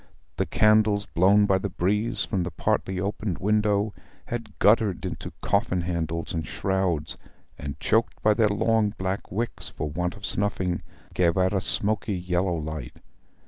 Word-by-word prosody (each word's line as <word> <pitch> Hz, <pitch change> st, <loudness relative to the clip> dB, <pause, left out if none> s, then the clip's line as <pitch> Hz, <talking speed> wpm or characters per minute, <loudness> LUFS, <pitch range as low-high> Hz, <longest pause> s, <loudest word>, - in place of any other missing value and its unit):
The -, -, 0 dB
candles, 105 Hz, -1 st, +4 dB
blown 95 Hz, +5 st, +4 dB
by 95 Hz, -2 st, +3 dB
the 100 Hz, -, -3 dB
breeze 105 Hz, +6 st, 0 dB
from 95 Hz, -4 st, -1 dB
the 90 Hz, -, -2 dB
partly 95 Hz, +1 st, -1 dB
opened 100 Hz, -1 st, -2 dB
window, 105 Hz, 0 st, +1 dB, 0.3 s
had 120 Hz, -2 st, -6 dB
guttered 105 Hz, -3 st, +3 dB
into -, -, -5 dB
coffin 100 Hz, -3 st, +1 dB
handles 85 Hz, -1 st, -2 dB
and 80 Hz, -1 st, -1 dB
shrouds, 90 Hz, -5 st, -1 dB, 0.4 s
and, 70 Hz, -1 st, -6 dB
choked 115 Hz, +1 st, +1 dB
by 105 Hz, -, +5 dB
their 110 Hz, 0 st, +3 dB
long 105 Hz, 0 st, +1 dB
black 95 Hz, +1 st, -3 dB
wicks 115 Hz, +5 st, -3 dB
for 75 Hz, -, -4 dB
want 90 Hz, +3 st, -2 dB
of 100 Hz, 0 st, -8 dB
snuffing, 95 Hz, -4 st, -1 dB, 0.3 s
gave 85 Hz, -1 st, +2 dB
out 95 Hz, +1 st, +2 dB
a 95 Hz, -, +1 dB
smoky 105 Hz, +1 st, 0 dB
yellow 90 Hz, 0 st, 0 dB
light. 80 Hz, -1 st, -5 dB
95 Hz, 155 wpm, -26 LUFS, 90-105 Hz, 0.4 s, by